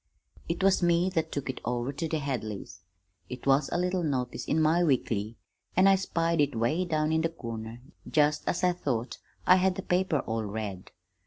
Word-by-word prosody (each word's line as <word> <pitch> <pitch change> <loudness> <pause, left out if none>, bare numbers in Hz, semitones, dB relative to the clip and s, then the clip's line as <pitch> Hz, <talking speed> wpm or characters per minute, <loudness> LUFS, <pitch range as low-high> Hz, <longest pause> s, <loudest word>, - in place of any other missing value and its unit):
"It 170 +3 -1
was 195 -1 +4
me 175 +1 +3
that 165 -3 -1
took 140 - -3
it 130 - -4
over 120 +3 -2
to 155 +4 -3
the 160 - -1
Hadleys. 110 - -4 0.5
It 125 -1 -7
was 135 +1 +3
a - - -1
little 180 +1 0
notice 130 -6 -2
in 155 - +1
my 160 +3 +3
weekly, 115 -7 0 0.4
an' 185 - +6
I 195 - +7
spied 170 -4 0
it 145 -2 +1
'way 150 +11 +1
down 155 -2 0
in 160 0 +2
the 165 - +1
corner 115 -6 -7 0.3
just 150 -1 +2
as 180 - -1
I 180 - +5
thought 130 -8 -3 0.3
I 185 - +7
had 185 0 +2
the 195 - -5
paper 180 -4 +1
all 110 0 -3
read. 100 -3 -5
150 Hz, 195 wpm, -28 LUFS, 120-175 Hz, 0.5 s, I